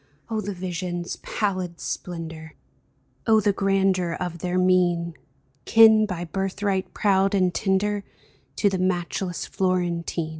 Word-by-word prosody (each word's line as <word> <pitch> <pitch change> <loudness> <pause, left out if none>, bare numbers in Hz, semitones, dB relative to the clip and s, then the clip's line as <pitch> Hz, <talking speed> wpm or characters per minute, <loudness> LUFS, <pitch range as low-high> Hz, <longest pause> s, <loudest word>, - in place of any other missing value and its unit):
Oh, 220 -1 0
the 205 -1 -5
vision's 175 -1 -4
pallid 185 -5 -3
splendor! 165 -2 -6 0.7
Oh, 220 -1 +6
the 205 -1 +2
grandeur 195 -3 +1
of 175 -2 -4
their 180 +1 -1
mien 175 -2 +2 0.3
— 130 -1 -40
Kin, 220 -1 +7
by 180 -3 -4
birthright 195 +1 -2
proud 195 -1 +2
and 185 -2 +2
tender, 205 +2 0 0.5
To 205 - +2
the 190 -2 0
matchless 180 0 -1
Florentine 175 -3 -1
185 Hz, 125 wpm, -24 LUFS, 175-195 Hz, 0.7 s, Kin